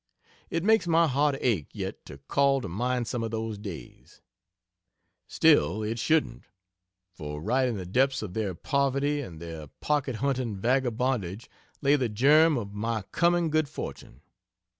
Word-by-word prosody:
It 165 0 -2
makes 220 -2 +3
my 165 0 +4
heart 145 +1 +2
ache 100 - +1
yet - - -6
to - - -10
call 140 - +2
to 100 - -5
mind 120 +7 -1
some 120 - -2
of 115 - -2
those 110 -1 -4
days. 85 - -10 1.0
Still, 150 -9 +3
it 110 +2 -3
shouldn't 155 +6 0 0.7
for 75 -5 -7
right 130 - +1
in 120 -4 -2
the 95 - -6
depths 130 +6 +1
of 95 -4 -6
their 100 -4 -2
poverty 140 - 0
and 85 - -9
their 80 -2 -8
pocket 145 -4 0
hunting 130 -3 -1
vagabondage 120 -3 -1 0.4
lay 140 +1 +5
the 125 -4 -1
germ 150 +8 +5
of 100 -4 -5
my 110 0 -2
coming 170 -1 +2
good 155 -2 +1
fortune. 70 - -8
125 Hz, 155 wpm, -27 LUFS, 105-140 Hz, 1.0 s, lay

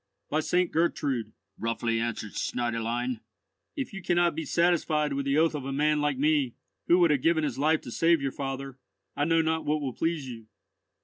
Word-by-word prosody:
"By 155 - +2
St. 180 +3 +1
Gertrude," 140 -9 0 0.3
roughly 115 0 -1
answered 115 -2 -3
the - - -5
Schneiderlein, 120 0 -2 0.6
"if 275 -7 -4
you 195 - -6
cannot 175 0 +2
be 160 - -4
satisfied 155 -2 +2
with 140 0 -2
the 140 +1 +2
oath 160 +1 +3
of 150 -3 -4
a 135 - -4
man 150 +2 +2
like 145 -2 0
me, 145 -3 +2 0.3
who 175 - +6
would 170 -3 +5
have 145 -3 +2
given 165 +1 +2
his 140 -4 -2
life 155 +2 +3
to 120 - -9
save 165 +5 +3
your 135 -1 -2
father, 135 -1 -5 0.4
I 145 - +1
know 165 0 +3
not 160 0 0
what 150 +1 0
will 135 -4 -3
please 165 -2 -1
you." 115 -3 -9
145 Hz, 200 wpm, -28 LUFS, 130-160 Hz, 0.6 s, who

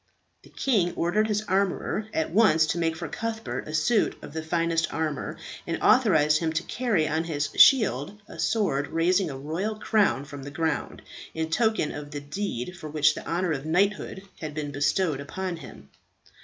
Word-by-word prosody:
The - - -18
king 205 -10 +1
ordered 185 +6 +1
his 210 0 0
armourer 200 +2 0
at 160 -5 -1
once 175 -6 +5
to 165 +2 -2
make 165 -1 0
for 165 0 -5
Cuthbert 225 +7 -4
a 155 - -6
suit 215 +8 +2
of - - -9
the 160 - -3
finest 165 0 0
armour, 155 -2 -3 0.3
and - - -2
authorized 155 - +4
him 165 -1 -1
to 165 +2 -1
carry 220 -11 0
on 160 +1 -1
his 150 -3 -2
shield 205 - +5
a - - -11
sword 165 -11 +1
raising 175 +3 +2
a 135 - -6
royal 165 +10 -3
crown 210 - +1
from 145 0 -9
the 140 - -7
ground, 160 +3 -2 0.3
in 160 0 -2
token 220 -5 +1
of 145 0 -7
the 145 0 -5
deed 150 - -4
for 155 - -7
which 150 0 +3
the - - -8
honour 175 +1 0
of 145 0 -3
knighthood 195 +2 0 0.2
had 155 -2 -6
been 150 -2 -3
bestowed 145 +2 +1
upon 180 +4 -4
him. 70 - -12
165 Hz, 185 wpm, -26 LUFS, 150-200 Hz, 0.3 s, once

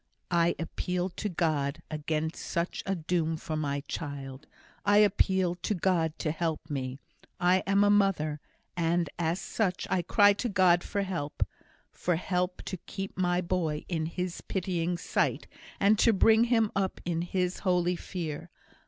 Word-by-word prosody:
"I 170 0 +3
appeal 180 +2 -2
to 210 +3 -4
God 155 -5 -1
against 155 +1 -2
such 170 +1 -2
a 195 - +1
doom 165 -1 0
for 155 0 -4
my 145 -2 -1
child. 140 -2 -6 0.4
I 205 0 +4
appeal 190 -3 +3
to 180 +4 -2
God 165 -3 +1
to 155 - -1
help 160 -2 -3
me. 130 -2 -3 0.4
I 180 +1 +4
am 200 +1 +4
a 205 - +5
mother, 185 -7 +2 0.4
and 170 -2 +1
as 170 +2 0
such 185 0 -1
I 185 - +2
cry 205 +4 +5
to 240 +4 -2
God 185 -3 +4
for 200 - -1
help 170 -7 -2 0.5
for 175 - 0
help 180 +1 -1
to 185 - -4
keep 195 +3 -6
my 180 -1 +1
boy 170 -4 -1
in 160 -3 -1
His 180 +1 -4
pitying 175 -2 -1
sight, - - 0 0.3
and 205 +2 +4
to 230 - +5
bring 220 +3 +5
him 225 -3 +2
up 190 -1 -1
in 170 -1 0
His 180 +1 -1
holy 180 -2 +2
fear. 165 -2 -5
175 Hz, 160 wpm, -29 LUFS, 160-190 Hz, 0.5 s, a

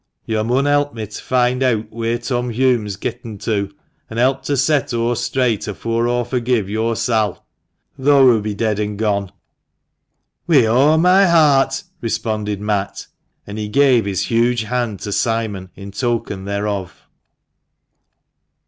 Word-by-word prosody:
Yo' 110 -1 -1
mun 125 +5 +1
help 145 -1 +1
me 110 -1 -4
t' 105 0 -9
find 125 0 +1
eawt 115 -4 0
wheer 115 +1 -2
Tom 125 0 -2
Hulme's 115 -4 +1
getten 110 0 -6
to, 100 -1 -2 0.4
an' 115 - -7
help 130 +3 +2
to 140 0 0
set 140 -1 +1
o' 115 +1 +1
straight 120 -2 -1
afore 115 +3 -1
aw 120 0 0
forgive 120 -3 -1
yo'r 110 +3 -1
Sail, 110 -4 -1 0.5
tho' 140 0 +5
hoo 120 -4 +5
be 105 0 -4
dead 105 -1 -1
an' 105 -1 -3
gone." 100 -3 -1 0.6
" - - -53
Wi' 145 -8 +5
o' 135 +8 +4
my 185 +4 +5
heart! 145 -5 +3
" - - -42
responded 105 -3 -2
Matt; 105 -1 -2 0.4
and 105 +1 -7
he 105 - -3
gave 125 -1 +3
his 100 -2 -1
huge 120 0 +1
hand 115 -3 -2
to 105 - -5
Simon 110 -4 -1
in 100 +1 -9
token 110 -3 -2
thereof. 100 -2 -4
115 Hz, 155 wpm, -19 LUFS, 105-130 Hz, 0.6 s, tho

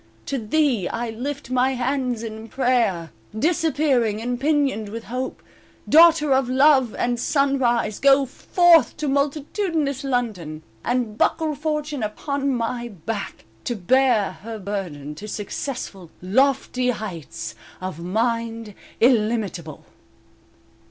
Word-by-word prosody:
To 275 - -2
thee 235 - +1
I 230 0 -3
lift 265 +3 -5
my 255 +1 +2
hands 250 -2 -1
in 220 0 -7
prayer 230 - +1 0.3
Disappearing, 285 -6 +1
and 245 +2 -3
pinioned 280 -8 +1
with 225 +2 -6
Hope; 255 +3 -5 0.4
Daughter 320 -2 +6
of 265 -1 +2
Love 265 -3 +4
and 240 0 -1
sunrise 250 -6 +1
Go 275 0 +5
forth 340 +5 +4
to 300 -1 -2
multitudinous 285 - -1
London, 210 - -2 0.2
And, 240 -3 -1
"buckle 315 -2 +1
fortune 300 -3 -3 0.2
on 280 -1 0
my 240 -1 -2
back" 205 0 -6 0.2
"To 240 - -1
bear 230 +1 +3
her 225 +2 -6
burden," 180 -8 -5
to 205 +8 -9
successful, 205 - -5
Lofty 255 +5 +1
heights 170 - -5 0.3
of 185 -3 -5
mind 225 +3 -2 0.3
illimitable. 215 - +1
245 Hz, 115 wpm, -23 LUFS, 215-275 Hz, 0.4 s, Daughter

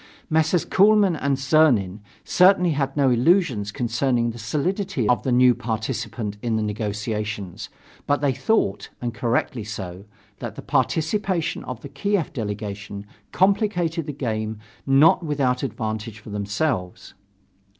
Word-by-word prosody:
Messrs. 160 +2 +2
Kuehlmann 200 -2 +4
and 140 -3 0
Czernin 130 - +3 0.2
certainly 180 -1 +4
had 140 -1 -2
no 135 -3 +4
illusions 125 - +2
concerning 120 +1 0
the 120 - -10
solidity 150 - -1
of 125 - +3
the 130 - -1
new 125 0 +6
participant 115 -2 -4
in 115 -2 -1
the 110 - 0
negotiations. 105 -2 -4 0.4
But 145 - +2
they 140 -2 +1
thought, 105 - 0
and 120 -1 -3
correctly 120 0 -1
so, 100 -3 -7 0.3
that - - -6
the - - -8
participation 175 +1 0
of 125 -3 -6
the - - -9
Kiev 200 -5 -1
delegation 100 -2 -5 0.3
complicated 180 -5 +1
the - - -2
game 110 -5 -3 0.3
not 145 +6 +5
without 140 -5 0
advantage 110 -3 -4
for 105 0 -11
themselves. 100 - -2
125 Hz, 130 wpm, -23 LUFS, 105-155 Hz, 0.4 s, new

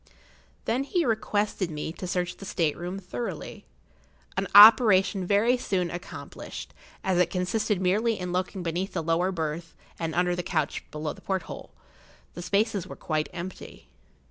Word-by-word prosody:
Then 250 +4 +1
he 340 +4 0
requested 210 -4 0
me 155 0 -4
to 185 - -6
search 180 0 -2
the - - -11
state 165 -6 0
room 175 +2 -5
thoroughly, 120 -11 -6 0.7
an - - -1
operation 205 -3 +8
very 220 +6 +3
soon 185 -7 -1
accomplished, 175 +1 -8 0.3
as 185 -2 +1
it 180 -1 +3
consisted 185 +3 0
merely 210 +5 +1
in 180 -1 -4
looking 185 +1 -2
beneath 175 +3 -2
the - - -2
lower 165 +3 +1
berth 165 -1 -4 0.2
and 165 -1 -3
under 180 0 +2
the 180 - -2
couch 160 -4 -2
below 150 0 -4
the - - -16
porthole. 190 -3 -4 0.6
The 175 - -7
spaces 200 +1 0
were - - -8
quite 155 -1 -2
empty. 180 +1 -8
180 Hz, 155 wpm, -27 LUFS, 170-200 Hz, 0.7 s, operation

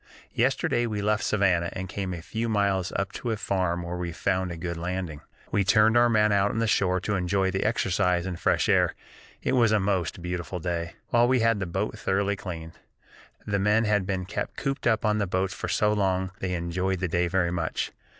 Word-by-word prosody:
Yesterday 120 0 +1
we 105 -2 -3
left 105 +1 +1
Savannah 95 -5 +2
and 95 0 -5
came 95 0 -4
a 85 -2 -6
few 115 +5 -3
miles 100 -3 +1
up 100 - -1
to 120 - -5
a 110 - 0
farm 90 -4 -1
where 85 +1 -4
we 90 -1 -3
found 95 +2 -1
a 85 - -6
good 85 +1 -4
landing. 85 -2 -4 0.3
We 100 - +2
turned 110 +4 +4
our 120 0 +5
men 105 -2 +3
out 100 0 +3
on - - -3
the 115 - +2
shore 95 -3 +2
to 105 - -2
enjoy 95 0 +1
the 95 - -1
exercise 90 -5 +1
and 90 -3 -4
fresh - - +2
air - - +3 0.5
(it - - 0
was 120 -4 +4
a 110 - +4
most 95 -3 -1
beautiful 90 0 -4
day), 85 -1 -3 0.2
while 120 0 +4
we 130 -1 +3
had 115 -2 +3
the 95 - -2
boat 95 +5 -3
thoroughly 100 +1 0
cleaned. 85 -4 -8 0.7
The 100 -1 0
men 105 +3 +3
had 105 -3 +1
been 95 -2 -2
kept 100 - -4
cooped 135 -2 -2
up 110 -1 +2
on 105 0 +2
the 100 - 0
boats 95 +1 -1
for - - -5
so 105 0 +2
long 95 -2 0
they 90 -1 -2
enjoyed 90 +2 -1
the 95 - -1
day 85 +1 +1
very 85 -1 +1
much. 85 -2 -2
95 Hz, 220 wpm, -26 LUFS, 90-105 Hz, 0.7 s, our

